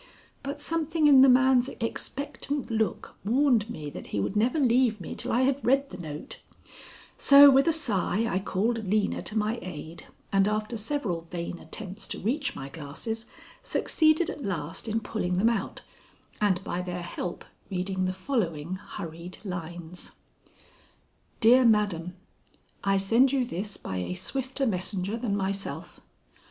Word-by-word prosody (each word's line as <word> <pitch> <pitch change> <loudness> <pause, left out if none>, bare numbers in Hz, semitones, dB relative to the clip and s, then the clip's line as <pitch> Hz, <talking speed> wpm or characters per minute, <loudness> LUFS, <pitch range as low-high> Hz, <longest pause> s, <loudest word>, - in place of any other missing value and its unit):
But 280 +1 -5
something 320 0 0
in 280 -3 +8
the 270 - +8
man's 260 0 +5
expectant 280 +3 -3
look 220 -4 -1
warned 235 0 +3
me 155 -11 -6
that - - -8
he 105 - -2
would 100 - -2
never 235 +8 +2
leave 245 -5 +3
me 175 - -6
till - - -3
I 240 - +3
had 270 +1 +1
read 275 +2 +2
the - - -7
note, 155 -3 -7 0.8
so 280 0 +9
with 270 +3 +4
a - - +6
sigh 225 - 0
I 185 - 0
called 210 +2 -1
Lena 210 +1 +1
to 215 - -3
my 215 +2 0
aid, 165 -1 -8 0.3
and 195 0 +4
after 215 +2 -1
several 210 - -3
vain 175 0 -5
attempts 190 +5 -7
to - - -5
reach 280 +7 -1
my 135 - -6
glasses, 165 - -6 0.3
succeeded 315 +1 +2
at 290 - -8
last 180 -1 -4
in 225 +1 0
pulling 205 -4 -2
them 205 +6 +4
out, 220 -5 -3 0.6
and 190 -3 +2
by 180 - -3
their 180 -1 -4
help 175 0 -5 0.2
reading 185 0 -1
the 185 - -1
following 185 - -2
hurried 175 -3 -8
lines: 175 -1 -6 1.3
"DEAR 245 +3 +7
MADAM: 200 -6 +2 0.7
"I 195 0 +3
send 230 +7 +4
you 265 -3 +1
this 205 -2 -4
by 95 - -5
a 90 - -3
swifter 265 +8 -2
messenger 195 -1 -1
than 225 -4 -1
myself. 195 0 -4
210 Hz, 155 wpm, -27 LUFS, 180-255 Hz, 1.3 s, so